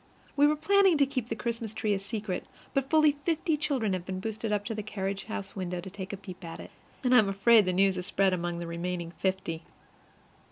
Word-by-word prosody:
We 290 Hz, +1 st, +6 dB
were 300 Hz, -, +3 dB
planning 385 Hz, +2 st, +4 dB
to 280 Hz, -, +5 dB
keep 255 Hz, -4 st, -3 dB
the 225 Hz, -, -1 dB
Christmas 230 Hz, -1 st, -3 dB
tree 215 Hz, -1 st, +1 dB
a 195 Hz, -, 0 dB
secret, 205 Hz, -2 st, -4 dB, 0.3 s
but 275 Hz, -1 st, 0 dB
fully 310 Hz, -1 st, +6 dB
fifty 325 Hz, -1 st, +1 dB
children 275 Hz, -9 st, 0 dB
have 185 Hz, -2 st, -2 dB
been 185 Hz, +1 st, -4 dB
boosted 220 Hz, +2 st, -3 dB
up 205 Hz, -1 st, 0 dB
to 225 Hz, -, -2 dB
the 215 Hz, -, -3 dB
carriage 195 Hz, -2 st, -4 dB
house 200 Hz, -3 st, -5 dB
window 180 Hz, -2 st, -3 dB
to 185 Hz, +2 st, -8 dB
take 190 Hz, -1 st, -6 dB
a 200 Hz, -, -4 dB
peep 190 Hz, -1 st, -10 dB
at 165 Hz, -1 st, -7 dB
it, -, -, -10 dB, 0.3 s
and 250 Hz, -1 st, +3 dB
I 250 Hz, -, +9 dB
am 205 Hz, -2 st, +3 dB
afraid 205 Hz, +2 st, +5 dB
the 185 Hz, -, +1 dB
news 190 Hz, +1 st, +3 dB
has 180 Hz, +1 st, -4 dB
spread 195 Hz, -1 st, +2 dB
among 175 Hz, -1 st, -2 dB
the 170 Hz, -, -4 dB
remaining 170 Hz, 0 st, -3 dB
fifty. 185 Hz, -4 st, -1 dB
200 Hz, 235 wpm, -29 LUFS, 185-245 Hz, 0.3 s, I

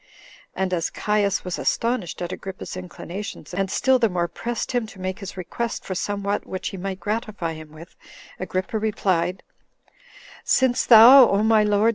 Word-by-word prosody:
And 190 Hz, -1 st, -1 dB
as 170 Hz, -2 st, 0 dB
Caius 205 Hz, -2 st, 0 dB
was 180 Hz, -, -3 dB
astonished 230 Hz, -8 st, -1 dB
at 175 Hz, -, -4 dB
Agrippa's 190 Hz, 0 st, -7 dB
inclinations, 185 Hz, +2 st, -8 dB
and 195 Hz, +1 st, -1 dB
still 260 Hz, +6 st, +2 dB
the 230 Hz, -2 st, +3 dB
more 175 Hz, -2 st, -1 dB
pressed 235 Hz, +7 st, -4 dB
him 245 Hz, -3 st, -1 dB
to 200 Hz, -, -14 dB
make 185 Hz, +1 st, -4 dB
his 195 Hz, -1 st, -8 dB
request 230 Hz, +6 st, -4 dB
for 190 Hz, -, -4 dB
somewhat 200 Hz, +2 st, -2 dB
which 185 Hz, -, -4 dB
he 195 Hz, -, -8 dB
might 190 Hz, +1 st, -5 dB
gratify 205 Hz, -4 st, -3 dB
him 155 Hz, -1 st, -11 dB
with, 160 Hz, +2 st, -13 dB, 0.4 s
Agrippa 185 Hz, +4 st, -3 dB
replied, 185 Hz, -4 st, -1 dB, 1.0 s
"Since 260 Hz, -2 st, +2 dB
thou, 245 Hz, +3 st, +9 dB
O 200 Hz, +2 st, +2 dB
my 220 Hz, -1 st, +4 dB
lord! 210 Hz, +1 st, +3 dB
195 Hz, 165 wpm, -23 LUFS, 185-220 Hz, 1.0 s, thou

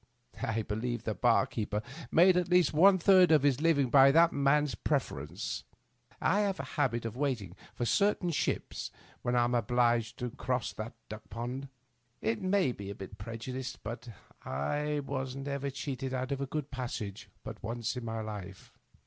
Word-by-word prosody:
I 115 Hz, 0 st, -1 dB
believe 120 Hz, +4 st, -3 dB
the 110 Hz, -, -1 dB
bar 120 Hz, +2 st, +3 dB
keeper 105 Hz, -1 st, -3 dB, 0.3 s
made 180 Hz, +2 st, +6 dB
at 180 Hz, -1 st, +1 dB
least 180 Hz, -4 st, +4 dB
one 190 Hz, +5 st, +7 dB
third 185 Hz, -1 st, +6 dB
of 150 Hz, -3 st, +5 dB
his 140 Hz, -1 st, +3 dB
living 145 Hz, -6 st, +3 dB
by 135 Hz, -1 st, +8 dB
that 165 Hz, +4 st, +5 dB
man's 140 Hz, 0 st, +2 dB
pref 100 Hz, -, 0 dB
erence. -, -, -5 dB, 0.6 s
I 205 Hz, -, +2 dB
have 200 Hz, -2 st, 0 dB
a -, -, -2 dB
habit 120 Hz, -3 st, 0 dB
of 115 Hz, 0 st, -4 dB
waiting 125 Hz, -10 st, -2 dB, 0.2 s
for 120 Hz, -, -1 dB
certain 200 Hz, -, +2 dB
ships 155 Hz, -, -2 dB, 0.3 s
when 120 Hz, 0 st, 0 dB
I 120 Hz, -, +4 dB
am 120 Hz, +1 st, 0 dB
obliged 120 Hz, 0 st, +2 dB
to 125 Hz, -1 st, -3 dB
cross 125 Hz, -2 st, -2 dB
that 110 Hz, +2 st, -6 dB
duck 105 Hz, 0 st, -9 dB
pond. 125 Hz, +4 st, -5 dB, 0.5 s
It 110 Hz, +1 st, -1 dB
may 185 Hz, -6 st, +2 dB
be 100 Hz, -4 st, -7 dB
a 100 Hz, -, -5 dB
preju 115 Hz, +6 st, -7 dB
dice, 130 Hz, 0 st, -4 dB
but 120 Hz, +1 st, -7 dB, 0.3 s
I 145 Hz, -, -1 dB
was 130 Hz, -2 st, -3 dB
never 140 Hz, 0 st, -3 dB
cheated 135 Hz, -1 st, -4 dB
out 130 Hz, +1 st, -3 dB
of 140 Hz, 0 st, -2 dB
a 140 Hz, -, -2 dB
good 150 Hz, 0 st, -4 dB
passage 120 Hz, -6 st, -5 dB
but -, -, -8 dB
once 115 Hz, +1 st, -3 dB
in 125 Hz, -, -5 dB
my 115 Hz, -1 st, -3 dB
life. 100 Hz, -3 st, -8 dB
130 Hz, 180 wpm, -31 LUFS, 115-145 Hz, 0.6 s, by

